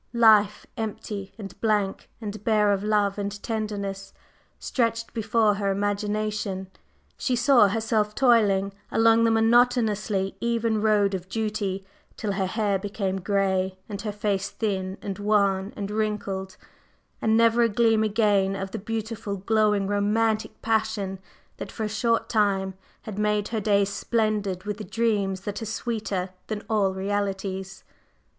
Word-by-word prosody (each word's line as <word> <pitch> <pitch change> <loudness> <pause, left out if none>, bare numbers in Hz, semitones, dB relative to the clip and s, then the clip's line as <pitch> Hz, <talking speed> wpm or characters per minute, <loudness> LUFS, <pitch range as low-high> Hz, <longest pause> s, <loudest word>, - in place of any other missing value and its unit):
Life 215 -3 +5
empty 210 -3 -5
and 195 -3 -9
blank 210 -3 0
and 210 -2 -6
bare 210 -2 +3
of 200 0 0
love 210 -1 +1
and 200 0 -4
tenderness, 200 -3 -4 0.4
stretched 230 -2 -1
before 220 -1 +2
her 200 0 -1
imagination; 205 -1 -2 0.5
she 255 - 0
saw 240 -3 +5
herself 215 0 0
toiling 205 -6 +3 0.2
along 225 0 +4
the - - +4
monotonously 225 -4 +2
even 230 -2 0
road 210 -2 +3
of 185 -1 -4
duty 210 -3 -2 0.3
till 210 - -2
her 195 -1 -1
hair 205 -1 0
became 195 -1 -3
gray 190 -1 0
and 205 -1 -5
her 215 - -3
face 200 -1 -1
thin 190 -3 -2
and 200 0 -4
wan 200 -1 +2
and 200 -1 -4
wrinkled, 210 -2 -2 0.6
and 220 0 +3
never 230 +1 +4
a 230 - +4
gleam 225 0 +3
again 205 -3 +2
of 195 0 -5
the - - -4
beautiful, 220 -1 -4
glowing, 210 0 +2
romantic 215 +2 0
passion 220 -4 0 0.4
that - - -7
for 220 - -4
a - - 0
short 230 +2 0
time 195 -3 +1 0.3
had 210 -2 -6
made 210 -1 +1
her 225 -2 -2
days 200 -1 +2
splendid 210 -4 -1
with 210 0 -4
the 215 - -6
dreams 205 -5 0
that 205 +3 -5
are - - -3
sweeter 210 -5 -3 0.2
than 215 -1 -4
all 210 -4 +2
realities. 195 0 -3
210 Hz, 145 wpm, -25 LUFS, 195-220 Hz, 0.6 s, Life